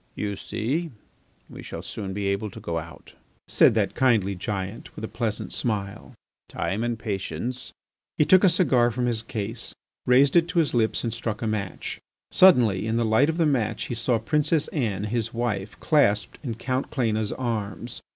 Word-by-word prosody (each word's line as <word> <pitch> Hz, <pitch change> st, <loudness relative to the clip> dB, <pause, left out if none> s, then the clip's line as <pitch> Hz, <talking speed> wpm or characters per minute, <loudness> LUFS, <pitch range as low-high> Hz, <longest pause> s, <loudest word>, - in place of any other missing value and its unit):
"You 100 Hz, -1 st, -3 dB
see 150 Hz, -, -2 dB, 0.6 s
we -, -, -10 dB
shall -, -, -7 dB
soon 100 Hz, -3 st, -5 dB
be 100 Hz, +1 st, -3 dB
able 100 Hz, +2 st, -1 dB
to -, -, -10 dB
go 85 Hz, -1 st, -3 dB
out," 80 Hz, -2 st, -12 dB, 0.3 s
said -, -, +5 dB
that -, -, +1 dB
kindly 110 Hz, -7 st, +2 dB
giant, 95 Hz, +3 st, -5 dB
with 110 Hz, -, -5 dB
a -, -, -5 dB
pleasant 115 Hz, -3 st, -3 dB
smile. 105 Hz, +1 st, -3 dB, 0.3 s
"Time 105 Hz, +4 st, -2 dB
and 120 Hz, -1 st, -1 dB
patience.. 105 Hz, +3 st, -4 dB, 0.2 s
." -, -, -66 dB
He 150 Hz, -, +4 dB
took 185 Hz, +4 st, +6 dB
a 190 Hz, -, +7 dB
cigar 135 Hz, -9 st, +3 dB
from 125 Hz, +1 st, -2 dB
his 115 Hz, -2 st, 0 dB
case, 115 Hz, 0 st, -4 dB, 0.3 s
raised 135 Hz, +4 st, +5 dB
it 170 Hz, -1 st, +5 dB
to 180 Hz, 0 st, -4 dB
his 160 Hz, -3 st, +3 dB
lips 115 Hz, -2 st, +1 dB
and 115 Hz, -2 st, -1 dB
struck 115 Hz, 0 st, -4 dB
a -, -, 0 dB
match. 100 Hz, -4 st, -4 dB, 0.3 s
Suddenly, 120 Hz, -, +5 dB
in 115 Hz, +1 st, 0 dB
the 120 Hz, -, +1 dB
light 110 Hz, +7 st, +4 dB
of 160 Hz, -, -1 dB
the 165 Hz, -, +3 dB
match, 115 Hz, -7 st, 0 dB
he -, -, -2 dB
saw 120 Hz, +1 st, +1 dB
Princess 150 Hz, +6 st, +1 dB
Anne, 105 Hz, -, -1 dB
his 115 Hz, +1 st, -2 dB
wife, 105 Hz, -4 st, -2 dB
clasped 105 Hz, -, +2 dB
in 120 Hz, -5 st, -3 dB
Count 130 Hz, +3 st, -2 dB
Cléna's 110 Hz, -5 st, 0 dB
arms. 115 Hz, -1 st, -4 dB
115 Hz, 185 wpm, -25 LUFS, 105-130 Hz, 0.6 s, a